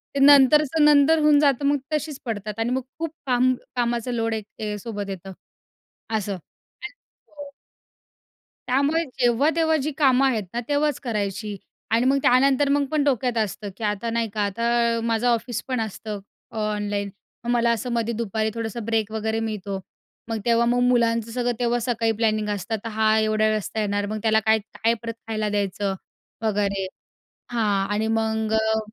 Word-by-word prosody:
ते -, -, 0 dB
नंतरचं 290 Hz, +2 st, +6 dB
नंतर 300 Hz, +2 st, +5 dB
होऊन 295 Hz, -1 st, +6 dB
जातं 280 Hz, -2 st, +2 dB
मग 285 Hz, +1 st, +3 dB, 0.2 s
तशीच 300 Hz, -1 st, -2 dB
पडतात 210 Hz, -1 st, -4 dB
आणि 225 Hz, -, 0 dB
मग 260 Hz, +1 st, 0 dB, 0.2 s
खूप 330 Hz, -2 st, -2 dB, 0.2 s
काम 255 Hz, 0 st, +3 dB, 0.2 s
कामाचं 240 Hz, 0 st, -1 dB
लोड 225 Hz, -1 st, -1 dB
एक 210 Hz, -1 st, -5 dB
सोबत 205 Hz, -2 st, -5 dB
येतं. 190 Hz, 0 st, -7 dB, 0.9 s
असं 205 Hz, -1 st, -3 dB
आणि 420 Hz, -, -13 dB, 0.4 s
हो. 290 Hz, -2 st, -10 dB, 1.2 s
त्यामुळे 285 Hz, +6 st, +2 dB, 0.2 s
जेव्हा 245 Hz, +4 st, +3 dB
तेव्हा 320 Hz, -1 st, +3 dB
जी 305 Hz, -, -1 dB
कामं 270 Hz, -3 st, +4 dB
आहेत 225 Hz, -6 st, 0 dB
ना 240 Hz, -, -1 dB
तेव्हाच 290 Hz, -1 st, +1 dB
करायची 210 Hz, -2 st, -3 dB, 0.4 s
आणि 230 Hz, +2 st, +3 dB
मग 275 Hz, +1 st, +4 dB
त्यानंतर 270 Hz, +3 st, +4 dB
मग 285 Hz, 0 st, +2 dB
पण 305 Hz, -2 st, +2 dB
डोक्यात 250 Hz, -4 st, 0 dB
असतं 210 Hz, -1 st, -2 dB
की 230 Hz, -, -8 dB
आता 210 Hz, +2 st, -1 dB
नाही 230 Hz, -1 st, -1 dB
का. 215 Hz, -, -1 dB
आता 235 Hz, +2 st, +1 dB
माझं 230 Hz, +1 st, +1 dB
अ 240 Hz, -, +5 dB
ऑफिस 235 Hz, 0 st, -3 dB
पण 255 Hz, -2 st, -1 dB
असतं 215 Hz, -1 st, -5 dB, 0.3 s
अ 225 Hz, -, -8 dB, 0.2 s
ऑनलाईन. 205 Hz, -1 st, -2 dB, 0.3 s
मग 240 Hz, -, -4 dB
मला 235 Hz, -1 st, +3 dB
असं 235 Hz, +2 st, -2 dB
मध्ये 235 Hz, 0 st, 0 dB
दुपारी 220 Hz, -1 st, -1 dB
थोडंसं 230 Hz, -1 st, -4 dB
ब्रेक 220 Hz, -2 st, 0 dB
वगैरे 220 Hz, 0 st, -1 dB
मिळतो. 205 Hz, -3 st, -3 dB, 0.5 s
मग 225 Hz, -, -1 dB
तेव्हा 235 Hz, 0 st, +3 dB
मग 245 Hz, +1 st, +2 dB
मुलांचं 230 Hz, -2 st, +2 dB
सगळं 245 Hz, 0 st, 0 dB
तेव्हा 240 Hz, 0 st, +1 dB
सकाळी 230 Hz, -1 st, 0 dB
प्लॅनिंग 215 Hz, -1 st, +1 dB
असतं. 205 Hz, +2 st, -2 dB
तर 230 Hz, -, -4 dB
हा 220 Hz, 0 st, +2 dB
एवढा 215 Hz, 0 st, +1 dB
वेळ 215 Hz, -, +3 dB
वाजता 215 Hz, +1 st, -3 dB
येणार 205 Hz, 0 st, -1 dB
मग 215 Hz, +1 st, -4 dB
त्याला 220 Hz, 0 st, +4 dB
काय 220 Hz, 0 st, +4 dB
काय 225 Hz, +2 st, -1 dB
परत 230 Hz, 0 st, -4 dB
खायला 215 Hz, -1 st, -1 dB
द्यायचं 200 Hz, -1 st, -1 dB, 0.5 s
वगैरे 200 Hz, -3 st, 0 dB, 0.7 s
हां 205 Hz, -4 st, +1 dB
आणि 220 Hz, +1 st, 0 dB
मग 220 Hz, 0 st, 0 dB
अ 220 Hz, 0 st, +2 dB
230 Hz, 175 wpm, -24 LUFS, 215-250 Hz, 1.2 s, नंतरचं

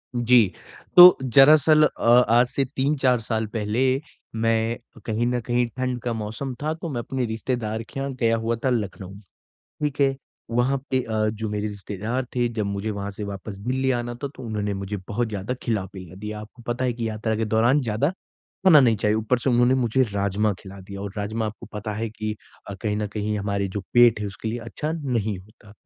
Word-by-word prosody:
जी, 120 Hz, -4 st, +4 dB, 0.4 s
तो 180 Hz, 0 st, +11 dB
दरअसल 150 Hz, +4 st, +6 dB
अ -, -, +1 dB, 0.2 s
आज 120 Hz, +2 st, +5 dB
से 135 Hz, -, -1 dB
3-4 135 Hz, -1 st, +1 dB
साल 110 Hz, -1 st, -2 dB
पहले 110 Hz, +2 st, -1 dB, 0.5 s
मैं 115 Hz, +1 st, +1 dB, 0.3 s
कहीं 110 Hz, +1 st, 0 dB
न 125 Hz, 0 st, 0 dB
कहीं 120 Hz, +1 st, +1 dB
ठंड 130 Hz, -1 st, -1 dB
का 120 Hz, -1 st, -2 dB
मौसम 110 Hz, +5 st, -4 dB
था, 155 Hz, +1 st, 0 dB
तो 165 Hz, +1 st, -6 dB
मैं 130 Hz, -5 st, -3 dB
अपने 130 Hz, +1 st, -2 dB
रिश्तेदार 110 Hz, 0 st, -3 dB
के 135 Hz, -, -8 dB
यहाँ 135 Hz, 0 st, -3 dB
गया 115 Hz, -1 st, +3 dB
हुआ 115 Hz, +1 st, -1 dB
था -, -, +4 dB
लखनऊ, 100 Hz, -5 st, -3 dB, 0.7 s
ठीक 145 Hz, -1 st, -1 dB
है। 135 Hz, -1 st, +3 dB, 0.3 s
वहाँ 120 Hz, +4 st, +2 dB
पे 130 Hz, -, +2 dB
अ, 110 Hz, -2 st, 0 dB
जो 110 Hz, 0 st, -3 dB
मेरे 105 Hz, 0 st, -2 dB
रिश्तेदार 105 Hz, +5 st, -4 dB
थे 120 Hz, -1 st, +1 dB
जब 115 Hz, -2 st, -3 dB
मुझे 100 Hz, +2 st, -3 dB
वहाँ 100 Hz, -1 st, -4 dB
से 105 Hz, +1 st, -6 dB
वापस 100 Hz, 0 st, -7 dB
दिल्ली 130 Hz, +5 st, -1 dB
आना 120 Hz, -1 st, -1 dB
था 140 Hz, +4 st, -5 dB
तो -, -, -9 dB
उन्होंने 105 Hz, -3 st, -2 dB
मुझे 100 Hz, +1 st, -4 dB
बहुत 120 Hz, +2 st, -1 dB
ज़्यादा 105 Hz, +3 st, -3 dB
खिला-पिला 95 Hz, -5 st, -4 dB
दिया। 105 Hz, +2 st, -6 dB
आपको 110 Hz, +3 st, -13 dB
पता 120 Hz, +2 st, -1 dB
है 125 Hz, -, +1 dB
कि 115 Hz, -1 st, -3 dB
यात्रा 110 Hz, +1 st, -2 dB
के 110 Hz, -, 0 dB
दौरान 115 Hz, +6 st, +3 dB
ज़्यादा, 115 Hz, +5 st, 0 dB
खाना 185 Hz, -2 st, +2 dB
नहीं 120 Hz, -4 st, +4 dB
चाहिए, 105 Hz, +1 st, +1 dB
ऊपर 110 Hz, +3 st, +1 dB
से 130 Hz, -, 0 dB
उन्होंने 120 Hz, +1 st, +4 dB
मुझे 130 Hz, 0 st, +2 dB
राजमा 100 Hz, +1 st, +1 dB
खिला 100 Hz, 0 st, -11 dB
दिया 100 Hz, +1 st, -9 dB
और 100 Hz, -1 st, -5 dB
राजमा 110 Hz, +2 st, -2 dB
आपको 105 Hz, -, -8 dB
पता 105 Hz, +1 st, -4 dB
है 115 Hz, +2 st, -2 dB
कि 110 Hz, 0 st, -4 dB, 0.4 s
अ, -, -, -5 dB
कहीं 105 Hz, -2 st, 0 dB
न 105 Hz, 0 st, -1 dB
कहीं 105 Hz, 0 st, -1 dB
हमारे 100 Hz, -1 st, -1 dB
जो 100 Hz, +2 st, -4 dB
पेट 120 Hz, -3 st, +6 dB
है 105 Hz, -, -2 dB
उसके 100 Hz, +2 st, -6 dB
लिए 115 Hz, +2 st, -3 dB
अच्छा 120 Hz, +7 st, -4 dB
नहीं 120 Hz, -, -2 dB
होता। 105 Hz, +2 st, -17 dB
115 Hz, 205 wpm, -24 LUFS, 105-125 Hz, 0.7 s, तो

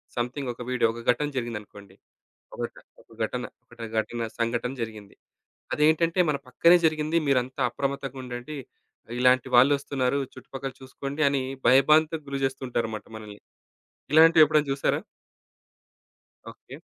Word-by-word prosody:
Something 125 Hz, +2 st, -3 dB
ఒక 120 Hz, -, -12 dB
video. 125 Hz, -2 st, +2 dB
ఒక 120 Hz, -, -8 dB
ఘటన 150 Hz, +4 st, -2 dB
జరిగిందనుకోండి. 105 Hz, -4 st, -6 dB, 0.6 s
ఒకట -, -, -4 dB, 0.3 s
ఒక -, -, -29 dB
ఘటన, -, -, -3 dB, 0.2 s
ఒకట 120 Hz, -1 st, -15 dB, 0.2 s
ఘటన 120 Hz, +1 st, -4 dB, 0.2 s
సంఘటన 120 Hz, +2 st, -1 dB
జరిగింది. 110 Hz, -3 st, -7 dB, 0.6 s
అదేంటంటే 160 Hz, +3 st, +2 dB
మన 145 Hz, -, +1 dB
పక్కనే 170 Hz, +7 st, +5 dB
జరిగింది. 155 Hz, +1 st, +1 dB
మీరంతా 130 Hz, -1 st, 0 dB
అప్రమత్తంగా 140 Hz, -1 st, -4 dB
ఉండండి. 125 Hz, +4 st, -7 dB, 0.6 s
ఇలాంటి 125 Hz, 0 st, +4 dB
వాళ్ళొస్తున్నారు. 140 Hz, 0 st, +3 dB
చుట్టుపక్కల 135 Hz, 0 st, -7 dB
చూసుకోండి 140 Hz, +3 st, -6 dB
అని 140 Hz, -1 st, 0 dB, 0.3 s
భయభాంతుకు 155 Hz, +4 st, +4 dB
గురిచేస్తూ 135 Hz, -1 st, -2 dB
ఉంటారన్నమాట 110 Hz, -3 st, -3 dB
మనల్ని. 105 Hz, -1 st, -11 dB, 0.7 s
ఇలాంటివి 160 Hz, +1 st, +7 dB
ఎప్పుడైనా 150 Hz, -1 st, +1 dB
చూసారా? 135 Hz, -, 0 dB, 1.5 s
ఓకే. -, -, -13 dB
135 Hz, 115 wpm, -26 LUFS, 120-150 Hz, 1.5 s, ఇలాంటివి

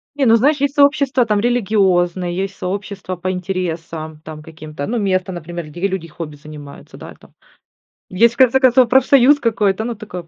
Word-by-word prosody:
Не, 285 Hz, -2 st, 0 dB
ну 225 Hz, -2 st, +5 dB
знаешь, 285 Hz, +6 st, +2 dB
есть 280 Hz, 0 st, -1 dB
сообщества 280 Hz, -3 st, +3 dB
там 210 Hz, -2 st, 0 dB
религиозные, 190 Hz, -6 st, 0 dB
есть 195 Hz, +1 st, -4 dB
сообщества 195 Hz, 0 st, -5 dB
по 185 Hz, +1 st, -4 dB
интересам 165 Hz, -4 st, -5 dB
там 155 Hz, -1 st, -10 dB
каким-то, 155 Hz, -2 st, -8 dB
ну, 240 Hz, +3 st, -2 dB
место, 190 Hz, -3 st, -1 dB
например, 170 Hz, -1 st, -7 dB
где 175 Hz, +6 st, -3 dB
люди 190 Hz, -4 st, -5 dB
хобби 150 Hz, -2 st, -8 dB
занимаются, 145 Hz, -1 st, -12 dB
да -, -, -11 dB
и -, -, -15 dB
там. -, -, -22 dB, 0.8 s
Есть, 230 Hz, +5 st, +2 dB
в -, -, -26 dB
конце 260 Hz, 0 st, +4 dB
концов, 255 Hz, -2 st, +4 dB
профсоюз 265 Hz, +2 st, +4 dB
какой-то, 215 Hz, -4 st, 0 dB
ну, 235 Hz, 0 st, -4 dB
такое. 180 Hz, -5 st, -9 dB
195 Hz, 180 wpm, -18 LUFS, 170-240 Hz, 0.8 s, ну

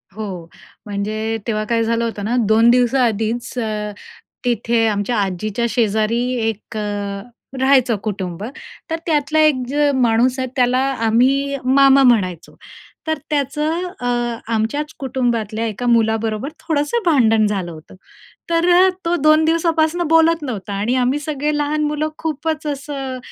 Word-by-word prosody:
हो. 195 Hz, -6 st, -6 dB, 0.4 s
म्हणजे 215 Hz, +2 st, -2 dB
तेव्हा 215 Hz, -2 st, -1 dB
काय 230 Hz, -1 st, +2 dB
झालं 230 Hz, +1 st, 0 dB
होतं 210 Hz, -3 st, -4 dB
ना, 235 Hz, +3 st, 0 dB
2 225 Hz, +2 st, +5 dB
दिवसा 250 Hz, +2 st, +3 dB
आधीच 225 Hz, +2 st, -2 dB
अ, 215 Hz, -2 st, -3 dB, 0.5 s
तिथे 235 Hz, -1 st, +1 dB
आमच्या 210 Hz, +2 st, -1 dB
आजीच्या 205 Hz, +4 st, -2 dB
शेजारी 220 Hz, +1 st, +1 dB, 0.3 s
1 220 Hz, 0 st, -7 dB
अ, 205 Hz, -1 st, -3 dB, 0.4 s
राहायचं 260 Hz, -3 st, +3 dB
कुटुंब 190 Hz, -4 st, -4 dB, 0.5 s
तर 325 Hz, -, 0 dB
त्यातला 310 Hz, -1 st, +1 dB
1 305 Hz, -2 st, +5 dB, 0.4 s
माणूस 245 Hz, +1 st, +2 dB
आहे. 260 Hz, -, -1 dB
त्याला 250 Hz, 0 st, +2 dB, 0.3 s
आम्ही 270 Hz, +5 st, +2 dB
मामा 275 Hz, +1 st, +5 dB
म्हणायचो. 185 Hz, -9 st, +1 dB, 0.5 s
तर 315 Hz, 0 st, 0 dB
त्याचं 300 Hz, +4 st, -1 dB
अ, 245 Hz, -, -3 dB, 0.5 s
आमच्याच 290 Hz, +8 st, -1 dB
कुटुंबातल्या 235 Hz, -4 st, -1 dB
एका 220 Hz, +3 st, -5 dB
मुलाबरोबर 225 Hz, +1 st, +1 dB, 0.2 s
थोडंसं 315 Hz, +9 st, 0 dB
भांडण 225 Hz, -9 st, +4 dB
झालं 190 Hz, -4 st, -3 dB
होतं. 160 Hz, +2 st, -13 dB, 0.6 s
तर 350 Hz, +2 st, +4 dB, 0.2 s
तो 340 Hz, +1 st, +1 dB
2 310 Hz, +1 st, +5 dB
दिवसापासनं 330 Hz, +1 st, +1 dB
बोलत 325 Hz, 0 st, +4 dB
नव्हता. 215 Hz, -7 st, -5 dB
आणि 210 Hz, +5 st, 0 dB
आम्ही 255 Hz, +3 st, +1 dB
सगळे 295 Hz, 0 st, -2 dB
लहान 295 Hz, +1 st, 0 dB
मुलं 300 Hz, +1 st, -1 dB
खूपच 315 Hz, 0 st, -3 dB
असं 275 Hz, -2 st, -4 dB
245 Hz, 135 wpm, -19 LUFS, 220-295 Hz, 0.6 s, 2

